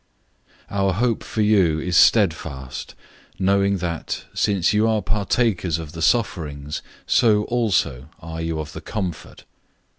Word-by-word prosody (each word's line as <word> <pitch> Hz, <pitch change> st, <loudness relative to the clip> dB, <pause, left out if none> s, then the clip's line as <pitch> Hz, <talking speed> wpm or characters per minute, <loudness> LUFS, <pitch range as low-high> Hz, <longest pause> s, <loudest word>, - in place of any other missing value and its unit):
001:007 100 Hz, -, -4 dB
Our 95 Hz, -1 st, +2 dB
hope 115 Hz, +3 st, 0 dB
for 110 Hz, -, -3 dB
you 95 Hz, -7 st, +3 dB
is 90 Hz, +2 st, -2 dB
steadfast, 80 Hz, -, +2 dB, 0.4 s
knowing 100 Hz, +1 st, +2 dB
that, 85 Hz, -3 st, -4 dB
since 100 Hz, -3 st, +1 dB
you 105 Hz, +2 st, +3 dB
are 110 Hz, -3 st, +1 dB
partakers 100 Hz, -4 st, 0 dB
of 80 Hz, -2 st, -7 dB
the 80 Hz, 0 st, -8 dB
sufferings, 75 Hz, -, -1 dB, 0.2 s
so 110 Hz, -4 st, +3 dB
also 100 Hz, -, 0 dB
are 80 Hz, 0 st, -7 dB
you 80 Hz, -1 st, -2 dB
of 75 Hz, -1 st, -6 dB
the -, -, -7 dB
comfort. 90 Hz, -7 st, -5 dB
95 Hz, 140 wpm, -22 LUFS, 80-105 Hz, 0.4 s, you